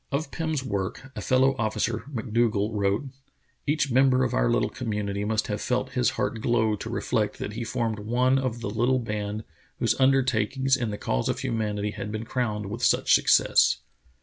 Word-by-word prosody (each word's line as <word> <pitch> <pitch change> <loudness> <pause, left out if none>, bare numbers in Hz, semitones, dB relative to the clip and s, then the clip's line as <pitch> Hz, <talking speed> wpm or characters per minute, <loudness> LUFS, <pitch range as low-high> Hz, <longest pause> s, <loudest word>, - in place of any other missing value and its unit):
Of 140 +1 -2
Pirn's 160 -4 -2
work 100 +3 -4
a - - -4
fellow 130 +1 +3
officer, 110 +1 -1
McDougal, 115 -3 0
wrote: 105 +6 0 0.6
Each 145 -2 +1
member 130 0 +4
of 125 - -1
our - - +2
little - - +1
community 105 -4 -3
must 110 +1 0
have 105 -1 -3
felt 125 0 -1
his 125 -2 +2
heart 110 - -1
glow 110 -2 +2
to 110 - -6
reflect 110 -2 -1
that 105 - -5
he 120 +2 -4
formed 115 -2 -2
one 125 +5 +2
of 125 -3 -3
the 100 - -3
little 120 +4 +2
band 105 -2 -3 0.3
whose 115 - +2
undertakings 130 0 +2
in 120 -3 -2
the 105 - -4
cause - - -1
of - - -2
humanity 105 -2 -1
had 105 - -6
been 110 +1 -4
crowned 110 -4 -2
with 120 +3 -5
such - - +3
success." - - +4
115 Hz, 180 wpm, -26 LUFS, 105-130 Hz, 0.6 s, member